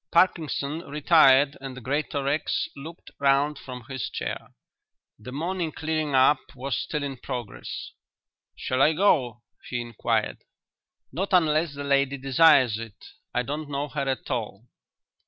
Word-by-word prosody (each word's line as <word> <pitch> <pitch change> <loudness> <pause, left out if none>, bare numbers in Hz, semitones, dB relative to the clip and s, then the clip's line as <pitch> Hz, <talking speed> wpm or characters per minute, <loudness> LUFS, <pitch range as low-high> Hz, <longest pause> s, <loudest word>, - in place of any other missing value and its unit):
Parkinson 155 -4 +1
retired 145 -2 +4
and 135 -1 -7
Greatorex 145 +1 -1
looked 160 +5 -10
round 140 +1 +2
from 125 -2 -9
his 130 -4 -4
chair. - - -5 0.7
The 110 +4 -9
morning 170 +4 -2
"clearing 155 -3 -2
up" 130 +2 +5 0.2
was 130 0 -3
still 150 +4 -3
in 135 -2 -4
progress. 120 -3 -6 0.6
"Shall 130 +1 -1
I 155 +3 +5
go?" 130 - +2 0.3
he 120 - -2
inquired. 120 -2 -1 0.7
"Not 190 +8 -3
unless 155 -3 +3
the 145 - -5
lady 140 0 +1
desires 135 -4 +4
it. 115 -3 -8 0.4
I 125 - 0
don't 145 +3 -5
know 145 +1 -3
her 140 -2 -2
at 130 - -3
all." 115 -3 -4
140 Hz, 135 wpm, -26 LUFS, 130-155 Hz, 0.7 s, up